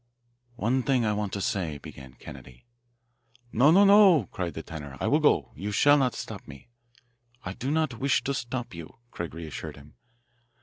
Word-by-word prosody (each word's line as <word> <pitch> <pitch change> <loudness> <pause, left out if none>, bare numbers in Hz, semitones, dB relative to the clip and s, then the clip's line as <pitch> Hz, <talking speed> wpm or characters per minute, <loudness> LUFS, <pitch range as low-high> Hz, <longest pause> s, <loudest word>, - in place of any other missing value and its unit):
"One 120 +3 0
thing 130 -2 +1
I 105 - +1
want 105 -1 -3
to 100 - -3
say," 85 -7 -2
began 65 -2 -12
Kennedy. 60 - -13 0.9
"No, 135 +6 +4
no, 195 +5 +6
no!" 195 - +6
cried 85 -5 -4
the 80 - -6
tenor. 70 -4 -9
"I - - -2
will - - +3
go - - +2
you 105 +2 -5
shall 145 +8 +5
not 130 -4 +1
stop - - -8
me." 70 - -13 0.8
"I 95 - -4
don't 135 0 -2
wish 135 0 +1
to 140 - -1
stop 120 -2 -4
you," 85 -2 -10 0.2
Craig 85 -3 -6
reassured 80 -4 -7
him. 70 +1 -16
105 Hz, 175 wpm, -27 LUFS, 80-135 Hz, 0.9 s, no